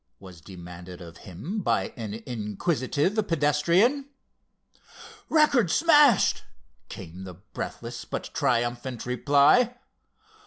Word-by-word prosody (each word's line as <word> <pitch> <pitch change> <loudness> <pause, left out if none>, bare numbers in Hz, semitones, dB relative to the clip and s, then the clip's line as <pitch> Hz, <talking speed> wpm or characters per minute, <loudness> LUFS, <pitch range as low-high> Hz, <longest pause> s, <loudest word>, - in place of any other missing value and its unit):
was 90 -3 -13
demanded 90 0 -11
of 85 -2 -12
him 155 - -5
by - - -1
an 110 -3 -6
inquisitive 130 - -2
pedestrian. 170 - +2 1.2
"Record 290 - +3
smashed!" 295 - +4 0.5
came 90 +3 -9
the 90 -2 -9
breathless 95 +4 -7
but - - -6
triumphant 120 0 -1
reply. 145 - +3
130 Hz, 90 wpm, -26 LUFS, -, 1.2 s, smashed